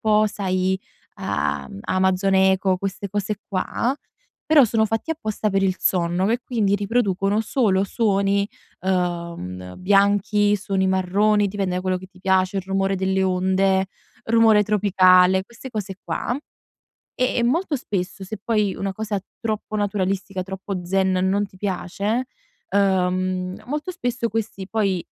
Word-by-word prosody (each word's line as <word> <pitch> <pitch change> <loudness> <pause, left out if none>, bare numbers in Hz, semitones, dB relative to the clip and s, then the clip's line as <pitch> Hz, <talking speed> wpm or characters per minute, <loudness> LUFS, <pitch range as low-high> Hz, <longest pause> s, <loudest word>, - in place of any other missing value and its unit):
po', 215 0 +3
sai, 190 -2 -1 0.3
a-mhmm, 70 +6 -3
Amazon 190 +1 +1
Echo, 190 -1 +3
queste 195 0 -4
cose 205 0 -2
qua, 230 +6 -1 0.5
però, 305 -4 +6
sono 220 0 +2
fatti 225 +8 -2
apposta 215 -8 -2
per 195 -1 +1
il 190 -1 +1
sonno, 175 +1 +1
me 235 +3 +1
quindi 210 -5 +1
riproducono 205 -1 +1
solo 210 -5 +1
suoni, 200 -2 +1 0.3
uhm, 170 - -3
bianchi, 205 +2 +3
suoni 190 -1 -1
marroni, 200 +3 +2
dipende 190 -2 -2
da - - -1
quello 185 0 0
che 185 - -9
ti 185 -1 -21
piace, 190 0 +2
il - - -3
rumore 195 0 0
delle 190 0 0
onde, 190 +1 +2 0.4
rumore 225 -2 +5
tropicale, 190 -2 +4
queste 235 +4 -11
cose 205 -4 -4
qua. 245 - -2 0.8
Ehm, 255 0 0
e - - +1
molto 315 +6 +1
spesso, 195 -6 -4
se 215 +3 -6
poi 210 -4 +1
una 195 0 -2
cosa 210 -1 -3 0.2
troppo 215 -1 -3
naturalistica, 195 -2 -1
troppo 190 -1 -5
zen, 190 +1 +1
non 190 +2 +1
ti 190 - -19
piace, 200 +5 -2 0.4
uhm, 185 -1 0
molto 300 +7 -3
spesso 245 -5 -2
questi 210 -3 -4
poi, 195 -5 0
195 Hz, 140 wpm, -22 LUFS, 185-210 Hz, 0.8 s, però